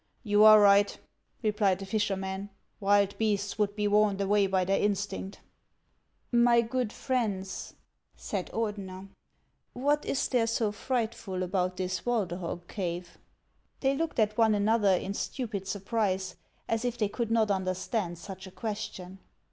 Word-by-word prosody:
" - - -41
You 205 +1 +6
are 215 0 +10
right," 205 0 +5 0.5
replied 210 -3 +2
the 195 - -7
fisherman; 195 -1 -2 0.2
" - - -45
wild 200 0 +3
beasts 205 -1 0
would 205 -1 +1
be 210 0 0
warned 205 -1 +3
away 200 0 +3
by 190 -1 +1
their 195 +2 +1
instinct." 200 -1 -2 0.5
" - - -45 0.2
My 235 -1 +5
good 240 -1 -2
friends," 205 -9 -3 0.4
said 195 -3 -4
Ordener, 195 -4 -4 0.3
" - - -46
what 290 +4 +1
is 270 - 0
there 240 -3 +1
so 225 -2 0
frightful 220 -4 -2
about 185 0 -1
this 185 0 -2
Walderhog 180 -7 -2
cave? 175 -3 -5 0.3
" - - -43
They 270 0 +2
looked 325 +2 -2
at 215 -1 +1
one 220 -2 +5
another 205 -1 +3
in 195 +2 -3
stupid 210 -4 -4
surprise, 195 -2 -1 0.3
as 225 0 -1
if 245 -1 -2
they 210 - +1
could 230 +2 -3
not 225 -2 +2
understand 185 0 -2
such 190 +1 -9
a - - -11
question. 195 -3 -6
205 Hz, 155 wpm, -29 LUFS, 190-225 Hz, 0.5 s, are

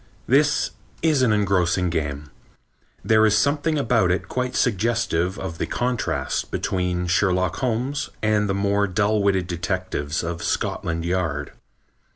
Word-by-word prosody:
This 145 +3 +3 0.3
is 155 -4 +3
an 125 -4 +4
engrossing 95 -4 +1
game. 75 -3 -3 0.7
There 110 0 +4
is 110 -1 +4
something 145 +6 +1
about 115 -8 +2
it 90 +1 0
quite 125 +3 -2
suggestive 105 -5 +1
of 90 -4 -6
the - - -1
contrast 125 -2 -2
between 90 -1 -1
Sherlock 90 0 +1
Holmes 130 +4 -1
and 105 -1 +1
the 95 - +1
more 100 +1 +1
dull 105 +2 +1
witted 95 -2 +2
detectives 85 -3 -3
of 85 0 -4
Scotland 85 0 -2
Yard. 80 -5 -1
100 Hz, 135 wpm, -23 LUFS, 90-115 Hz, 0.7 s, an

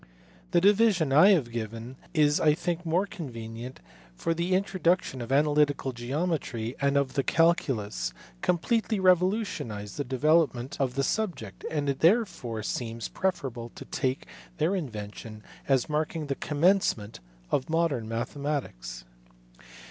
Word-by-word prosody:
The - - +4
division 195 -6 +4
I 160 +8 +8
have 150 - +3
given 115 +2 -5 0.2
is 150 -3 +3
I 150 -1 +4
think 175 0 -3
more 175 +5 +2
con 170 -7 -7
venient, 115 +2 -7 0.4
for 165 - -1
the 170 +2 0
introduction 185 -7 +1
of 120 +2 -6
analytical 145 -1 +2
geometry 125 -2 -2
and 140 0 +2
of 135 -2 +1
the 140 - +2
calculus 125 - +1 0.3
completely 220 +4 +1
revolutionized 180 - +1
the 145 - -1
development 135 -1 +1
of 130 -2 0
the 135 - +1
subject, 150 - -2
and 145 -2 -1
it 140 -1 -1
therefore 165 - +2
seems 115 0 -4
preferable 135 -11 -2
to - - -9
take 130 -1 -2 0.3
their 165 +6 +1
in 165 -8 -2
vention 105 0 -8 0.3
as 135 -3 +2
marking 155 +1 -1
the 140 - -1
commencement 150 - +1 0.3
of 130 - 0
modern 160 -9 0
mathematics. 115 - -4
145 Hz, 135 wpm, -28 LUFS, 120-170 Hz, 0.4 s, I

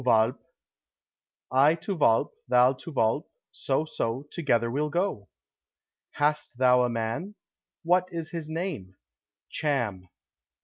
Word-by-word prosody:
"To - - -11
Walpe." 115 +3 +3 1.1
"I 140 +5 +5
to 180 +4 -4
Walpe, 115 -8 +3 0.2
thou 125 +1 +5
to 140 +6 -10
Walpe, 115 +1 0 0.2
so, 140 +3 -1
so, 120 -3 -3
together 120 -8 +1
we'll 150 +4 -1
go." 155 - -2 0.8
"Hast 150 -4 0
thou 125 -1 +5
a 125 - +2
man? 115 - -3 0.5
What 180 +2 +3
is 165 -2 -5
his 165 -3 -5
name?" 160 - -4 0.6
"Cham." 115 - -1
135 Hz, 125 wpm, -27 LUFS, 115-160 Hz, 1.1 s, I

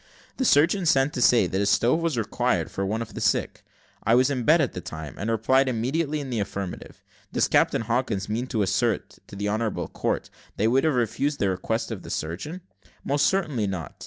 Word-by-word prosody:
The 260 - 0
surgeon 175 +2 +4
sent 135 0 +3
to 125 - -3
say 120 -4 +5
that 95 +2 -1
a - - +1
stove 125 +10 +3
was 165 -6 -1
required 110 -3 0
for 100 - -3
one 110 +4 -1
of 115 - -13
the - - -6
sick. - - 0 0.4
I 115 - +4
was 130 +3 +4
in 125 -4 -2
bed 160 +3 +6
at 140 -6 0
the 90 - -5
time, 80 -5 -7
and 105 - -2
replied 130 +4 +2
immediately 140 +6 -1
in 135 -3 -6
the 115 - -1
affirmative. 100 -2 -6 0.3
Does - - +2
Captain - - +2
Hawkins 115 -3 -1
mean 115 +4 -2
to 110 -4 0
assert 115 +5 -1
to - - -11
the 100 +1 -2
honourable 110 +1 -1
court, - - -3 0.3
that - - -1
he - - +4
would 135 +5 +3
have 155 -4 +2
refused 135 +5 0
the 100 - +1
request 110 +6 -2
of 105 -5 -5
the - - -10
surgeon? 95 - -4 0.4
Most 145 +1 +2
certainly 150 - 0
not. 90 -8 -5
115 Hz, 220 wpm, -25 LUFS, 100-140 Hz, 0.4 s, bed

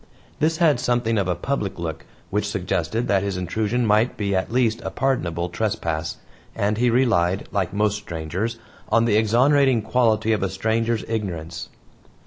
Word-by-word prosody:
This 160 +1 +2
had 155 -7 +3
something 120 -3 +1
of 95 - 0
a 90 - 0
public 100 +1 -2
look, 80 -2 -5 0.2
which - - 0
suggested 115 +2 -1
that 100 -1 +2
his 100 -1 -2
intrusion 110 +6 -1
might 110 +3 +2
be 100 -2 0
at 95 +3 -1
least 115 -2 +1
a - - -4
pardonable 90 -11 -1
trespass, 85 -4 -2 0.4
and 105 +2 0
he 125 0 +3
relied, 110 -7 +2
like 95 -4 -1
most 105 0 +1
strangers, 95 +5 -4 0.3
on 115 0 +3
the 110 -3 +2
exonerating 125 +3 +4
quality 110 -1 +2
of 110 - 0
a 95 - 0
stranger's 110 +3 0
ignorance. 90 -7 -4
110 Hz, 160 wpm, -23 LUFS, 95-120 Hz, 0.4 s, exonerating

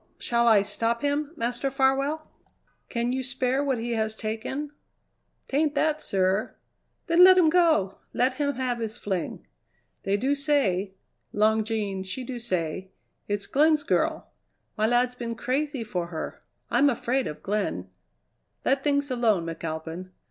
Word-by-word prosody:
"Shall 235 0 +1
I 215 -3 +6
stop 230 +4 -1
him, 290 +1 0
Master 240 +2 -1
Farwell?" 275 +3 +1 0.6
"Can 235 +1 -1
you 260 - -1
spare 260 +1 0
what 270 -3 0
he 235 +1 -3
has 220 -1 0
taken?" 230 +7 -4 0.8
"'Tain't 295 +2 +1
that, 310 +1 +1
sir." 190 +2 0 0.5
"Then 345 +1 +6
let 370 0 +9
him 325 -4 +5
go! 320 - +3
Let 255 +2 +2
him 285 0 +1
have 250 -2 -1
his 225 0 -4
fling." 190 -7 -3 0.6
"They 195 +1 0
do 265 +7 +1
say 240 -11 +1 0.4
Long 220 +1 +3
Jean, 210 -3 -2
she 190 +7 -5
do 245 0 -5
say 185 -4 -3 0.4
it's 205 -1 -2
Glenn's 305 +4 +3
girl. 320 - 0 0.4
My 215 +1 +2
lad's 245 +1 +2
been 235 -2 -5
crazy 275 +1 -1
for 180 -6 -3
her. 160 -2 -6 0.3
I'm 275 +4 +5
afraid 255 +1 0
of 150 - -7
Glenn." 195 - -2 0.8
"Let 270 0 +2
things 285 -1 +1
alone, 220 -8 +2
McAlpin. 165 +2 -5
240 Hz, 150 wpm, -26 LUFS, 205-280 Hz, 0.8 s, let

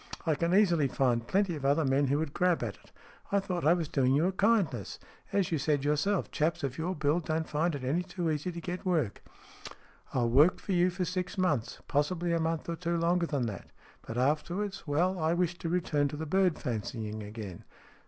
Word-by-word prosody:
I 160 - +3
can 170 +3 0
easily 175 -8 +4
find 120 -3 0
plenty 195 -3 +1
of 145 - -7
other 140 +3 +3
men 135 +1 +2
who 140 +2 +2
would 155 -2 -2
grab 180 -6 +2
at 110 -4 -3
it. - - -21 0.4
I 200 - +3
thought 180 -5 -2
I 170 - +6
was 165 -3 -2
doing 130 -2 +2
you 155 +4 +3
a 185 - +2
kindness. 190 - +1 0.3
As 195 -4 +1
you 160 - +1
said 145 0 +1
yourself, 150 +7 +1
chaps 165 +1 0
of 135 -2 -2
your 180 +3 -1
build 155 +2 0
don't 160 0 -1
find 155 +2 0
it 135 - -6
any 145 +7 +1
too 175 -2 -2
easy 155 +4 -2
to 170 - -6
get 180 +3 -5
work." 160 - 0 0.5
" - - -22
I 130 - +2
will 115 -1 +1
work 150 +9 +5
for - - -5
you 180 0 +4
for 180 0 -2
six 180 +1 -3
months 150 - 0
possibly 170 +4 0
a 170 - +2
month 165 0 -1
or 170 -1 -3
two 170 0 -1
longer 170 +1 +2
than 140 -6 -1
that. 105 -5 -6 0.3
But, 115 - -7
afterwards, 165 +8 -1
well, 175 +6 +1
I 160 +1 +2
wish 175 -1 0
to 165 - -3
return 165 -5 +1
to 145 - -6
the 160 - -4
bird 185 +1 +2
fancying 110 -3 -4
again." 105 -4 -8
160 Hz, 220 wpm, -30 LUFS, 140-180 Hz, 0.5 s, I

